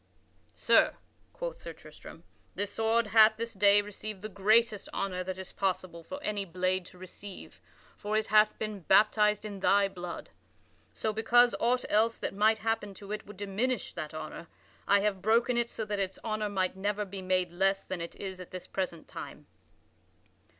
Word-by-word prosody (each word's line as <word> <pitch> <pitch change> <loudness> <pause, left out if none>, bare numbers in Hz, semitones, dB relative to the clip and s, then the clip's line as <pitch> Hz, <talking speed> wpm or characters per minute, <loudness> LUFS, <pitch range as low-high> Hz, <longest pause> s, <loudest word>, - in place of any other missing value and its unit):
"Sir," - - +4 0.4
quoth - - -6
Sir - - -7
Tristram, - - -13 0.3
"this 205 0 -2
sword 225 +1 +2
hath 220 0 +6
this 230 +1 -4
day 205 0 +5
received 210 0 -7
the 215 - -4
greatest 215 +2 +2
honor 185 -2 -2
that 185 0 -5
is 190 0 -8
possible 185 -3 -2
for 280 - -7
any 210 -4 -1
blade 185 0 -1
to - - -16
receive; 185 +2 -10 0.4
for 210 +1 -1
it 220 - +1
hath 215 0 +4
been 215 -2 -4
baptized 210 +3 +3
in 205 -2 -6
thy 200 +1 +4
blood. 180 -3 -7 0.6
So, 220 - -1
because 240 +2 +4
aught 245 +2 +1
else 225 +2 +2
that - - -4
might 215 +2 +3
happen 220 -2 -2
to 200 +1 -10
it 210 -1 -5
would 205 -1 -11
diminish 205 +5 -2
that 155 -3 -5
honor, 160 +1 -7 0.4
I 200 0 +5
have 200 -2 0
broken 230 +4 +3
it 235 0 +1
so 220 - -4
that 205 -1 -3
its 195 -1 -1
honor 215 -1 -2
might 190 -2 -1
never 205 +2 -1
be 195 0 -7
made 185 -1 0
less 195 +2 +1
than 185 -2 -5
it 170 - -6
is 190 -2 -6
at 185 - -9
this 185 -1 -7
present 180 -4 -4
time." - - -9
205 Hz, 180 wpm, -30 LUFS, 190-220 Hz, 0.6 s, hath